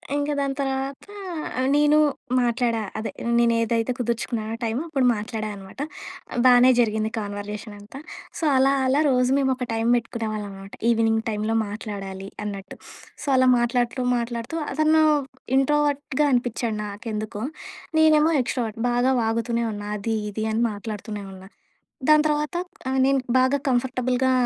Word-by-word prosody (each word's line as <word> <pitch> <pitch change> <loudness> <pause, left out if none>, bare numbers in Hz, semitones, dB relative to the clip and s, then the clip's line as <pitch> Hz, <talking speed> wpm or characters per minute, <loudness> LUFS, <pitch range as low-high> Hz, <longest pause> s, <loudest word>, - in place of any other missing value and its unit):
ఇంక 290 +1 0
దాని 275 -1 -1
తర్వాత 270 0 -2 0.7
నేను 295 +1 +4 0.4
మాట్లాడా. 235 -2 +1 0.2
అదే 220 - -3 0.3
నేనేదైతే 230 0 +2
కుదుర్చుకున్నానో 230 -1 -2
టైము, 230 +4 -1
అప్పుడు 275 -5 +1
మాట్లాడా 215 0 -4
అనమాట. 195 +6 -12 0.7
బానే 250 0 +7
జరిగింది 220 -1 +1
కాన్వర్జేషన్ 205 +1 -6
అంతా. 215 +7 -11 0.4
సో - - -6
అలా, 270 +1 +4
అలా 275 +3 +3
రోజు 250 0 +2
మేమొక 260 -2 0
టైమ్ 225 +1 0
పెట్టుకునేవాళ్ళం 215 -3 -4
మాట. 195 +1 -11 0.2
ఈవినింగ్ 225 -1 +2
టైమ్‌లో 215 +1 -1
మాట్లాడాలి 195 -2 -6 0.2
అన్నట్టు. 200 -1 -6 0.5
సో - - -8
అలా 260 0 +4
మాట్లాడుతూ, 240 +1 0
మాట్లాడుతూ 235 +5 -4 0.2
అతను 310 0 +4 0.5
ఇంట్రోవర్ట్‌గా 290 0 +1
అనిపిచ్చాడు 240 -2 0
నాకెందుకో. 210 +1 -5 0.6
నేనేమో 315 0 +5
ఎక్స్‌ట్రోవర్ట్. 225 -2 -3
బాగా 245 +2 +2
వాగుతూనే 230 +1 0
ఉన్నా. 205 0 -6
అది 225 +2 -1 0.2
ఇది 215 +2 -3
అని 230 - +1
మాట్లాడుతూనే 210 0 -6
ఉన్నా. 190 +1 -12 0.6
దాని 305 0 +7
తర్వాత 300 +2 -1 0.3
ఆహ్, 265 - 0
నేను 275 0 +3 0.2
బాగా 260 +2 +3
కంఫర్టబుల్‌గా 255 0 +1
235 Hz, 130 wpm, -24 LUFS, 215-265 Hz, 0.7 s, బానే